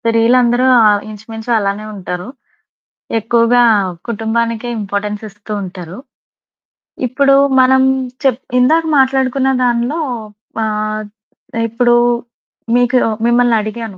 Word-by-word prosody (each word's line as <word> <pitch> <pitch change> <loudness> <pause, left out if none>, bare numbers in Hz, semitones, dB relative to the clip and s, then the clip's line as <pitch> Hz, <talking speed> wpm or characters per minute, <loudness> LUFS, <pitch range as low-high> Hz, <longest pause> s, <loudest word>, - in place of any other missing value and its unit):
స్త్రీలందరూ 240 +2 +2 0.2
ఆహ్, 205 -1 +3
ఇంచు 215 0 -12
మించు 225 +2 -7
అలానే 200 +1 -2
ఉంటారు. 180 -1 -6 0.9
ఎక్కువగా 230 +2 +2 0.5
కుటుంబానికే 230 +1 -2
ఇంపార్టెన్స్ 205 +1 -4
ఇస్తూ 205 +1 -11
ఉంటారు. 180 -1 -8 1.1
ఇప్పుడు 275 +2 +3 0.2
మనం 260 0 +4 0.4
చెప్ 260 -3 +1 0.2
ఇందాక 315 +6 +3
మాట్లాడుకున్న 265 0 +2
దానిలో 245 +5 0 0.6
ఆహ్, 215 0 -2 0.6
ఇప్పుడు 240 +1 +2 0.8
మీకు 245 +1 +2 0.3
మిమ్మల్నడిగాను. 230 -3 0
230 Hz, 90 wpm, -15 LUFS, 210-245 Hz, 1.1 s, మనం